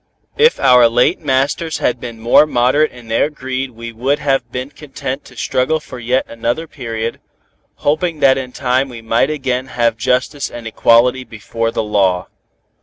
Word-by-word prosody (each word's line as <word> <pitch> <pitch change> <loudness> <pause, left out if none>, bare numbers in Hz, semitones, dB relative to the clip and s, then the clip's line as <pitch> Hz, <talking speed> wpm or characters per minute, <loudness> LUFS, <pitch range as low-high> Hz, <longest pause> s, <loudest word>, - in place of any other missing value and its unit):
If 465 +2 +4
our 125 -3 +6
late 120 +2 +2
masters 140 +4 0
had 125 - 0
been 120 -2 -8
more 120 +6 +5
moderate 135 +4 +2
in 120 -2 -14
their 115 +6 +1
greed 130 -2 -4
we 115 -1 -9
would 130 +6 0
have 135 -4 -1
been 130 +3 -5
content 140 -1 -6
to 125 - -16
struggle 130 +8 0
for 150 -4 -10
yet 125 +3 0
another 120 +7 -2
period, 115 -5 -5 0.6
hoping 155 +2 -1
that 135 -2 +5
in 130 -1 -5
time 130 +1 0
we 115 -2 -10
might 115 +4 +1
again 130 -4 -2
have 120 -2 0
justice 125 +5 -1
and 120 -1 -9
equality 120 +3 +3
before 115 0 -4
the 115 - -2
law. 95 -4 +1
125 Hz, 170 wpm, -17 LUFS, 115-135 Hz, 0.6 s, our